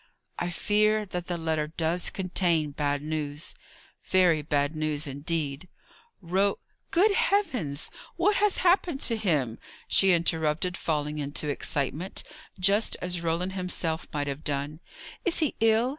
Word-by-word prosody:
"I 175 - -1
fear 215 +3 +2
that 180 -2 -5
the 175 - -2
letter 160 -2 -1
does 165 +2 -1
contain 175 -5 0
bad 145 0 -1
news; 150 -1 -3 0.5
very 180 -4 +3
bad 145 0 0
news, 155 -1 -1
indeed. 145 +2 -3 0.5
Ro 190 +3 +1 0.2
" - - -46
"Good 395 +6 +4
heavens! 255 - +1 0.2
what 400 +4 +3
has 415 -1 +3
happened 350 -5 +3
to 230 - +2
him?" 150 - 0 0.3
she 195 -1 +4
interrupted, 165 0 +1
falling 150 -2 -1
into 145 +1 -2
excitement, 145 +5 -2 0.4
just 200 +4 +3
as 180 -1 -1
Roland 170 +3 -1
himself 180 -3 -1
might 145 -1 -1
have 145 +2 -5
done. 145 +1 -3 0.4
"Is 360 - +2
he 310 -3 +2
ill? 225 +2 +4
170 Hz, 140 wpm, -27 LUFS, 150-195 Hz, 0.5 s, Good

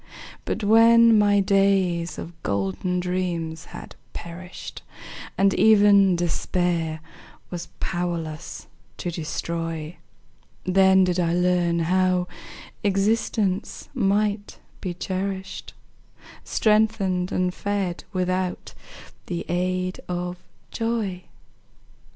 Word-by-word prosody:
But - - -3
when 230 +2 +6
my 205 -1 +4
days 190 -3 +2
of 170 - -7
golden 100 - -1
dreams 175 -3 -2
had - - -10 0.2
perished, 175 +2 -8 0.6
And 195 0 +4
even 200 -2 +6
Despair 170 -2 -1 0.5
was 175 -1 -5
powerless 170 -2 -4 0.3
to 175 - -3
destroy, 165 0 -4 0.7
Then 190 0 +5
did 180 0 +1
I 170 -1 +1
learn 175 -1 +2
how 180 +1 +2 0.6
existence 200 0 0
might 205 -2 0 0.2
be 180 -3 -4
cherished, 190 +1 -4 0.7
Strengthened 210 -4 +1
and 180 0 0
fed 200 -4 -2
without 185 -1 -2 0.5
the 170 -1 -3
aid 185 +1 -1
of 180 0 -3 0.3
joy. 220 -6 -2
185 Hz, 90 wpm, -24 LUFS, 175-200 Hz, 0.7 s, when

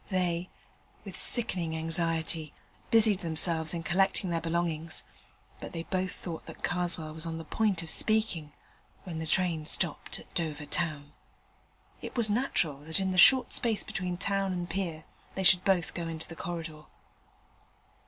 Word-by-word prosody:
They, 180 -2 0 0.6
with - - -8
sickening 175 -9 +2
anxiety, 165 -1 -1 0.3
busied 220 -4 +6
themselves 160 -1 0
in 170 -1 -3
collecting 190 +2 +1
their 165 -1 0
belongings; 165 -1 -1 0.6
but - - -8
they 165 - -4
both 185 +1 -2
thought 165 -3 -7
that - - -11
Karswell 175 -3 -1
was 160 +1 -3
on 165 0 -3
the 165 - -7
point 200 -2 0
of 160 - -4
speaking 215 -9 +1 0.5
when 170 -4 -5
the 160 - -3
train 170 -2 +2
stopped 170 -3 0
at - - -15
Dover 155 -3 -2
Town. 145 -2 -2 0.9
It - - -7
was 220 -3 +4
natural 205 - +1
that 160 +3 +3
in 190 -1 0
the 185 - +1
short 260 +7 +7
space 225 -3 +1
between 180 -1 -3
town 195 0 0
and 175 -1 -3
pier 165 -3 -3 0.3
they 190 - -2
should 180 0 +5
both 185 -4 +2
go 170 -1 -4
into 160 -1 -2
the 165 - -9
corridor. 165 -3 -6
170 Hz, 160 wpm, -30 LUFS, 160-190 Hz, 0.9 s, short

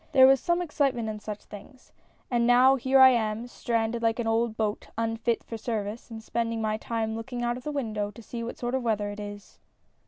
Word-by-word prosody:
There 260 -1 +8
was 270 0 +6
some 345 +6 0
excitement 270 -8 0
in 215 -1 -5
such 210 -1 -7
things. 230 +6 -13 0.4
And, 235 -1 +2
now 255 +2 +6
here 265 +1 +3
I 260 0 +10
am 225 -2 0
stranded 230 -1 -2
like 225 -1 +1
an 240 - -2
old 225 0 0
boat, 215 -1 -2
unfit 225 +1 -1
for 230 - -6
service, 220 0 -4
and 225 -1 -8
spending 230 0 -2
my 215 -1 0
time 220 0 -2
looking 240 +2 -5
out 240 0 0
of 250 - -9
the 300 - -3
window 215 -7 -2
to 215 +3 -13
see 230 +1 -6
what 235 - -6
sort 240 0 -3
of 265 - +1
weather 210 -3 -1
it 205 - -8
is." 205 0 -9
230 Hz, 220 wpm, -27 LUFS, 220-245 Hz, 0.4 s, I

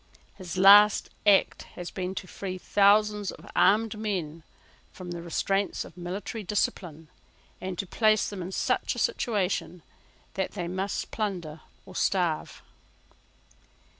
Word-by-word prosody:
His 185 -2 -8
last 205 +2 +7 0.2
act 200 -2 +4 0.2
has 175 -1 -6
been 185 0 -4
to 185 - -5
free 185 0 -6
thousands 205 +1 +3
of - - -10
armed 215 +3 +3
men 175 -7 -3 0.5
from 180 -2 -9
the 170 -1 -5
restraints 195 +4 -1
of - - -14
military 185 +5 -5
discipline, 175 -5 -2 0.5
and 185 -1 -5
to 195 - -3
place 215 +3 +2
them 200 -3 -6
in 180 +2 -6
such - - -1
a - - -9
situation 200 - -1 0.5
that 190 -1 -3
they 175 -4 -4
must 190 +3 -3
plunder 175 -8 -4 0.2
or 185 - -13
starve. 175 -5 -1
190 Hz, 135 wpm, -27 LUFS, 175-205 Hz, 0.5 s, last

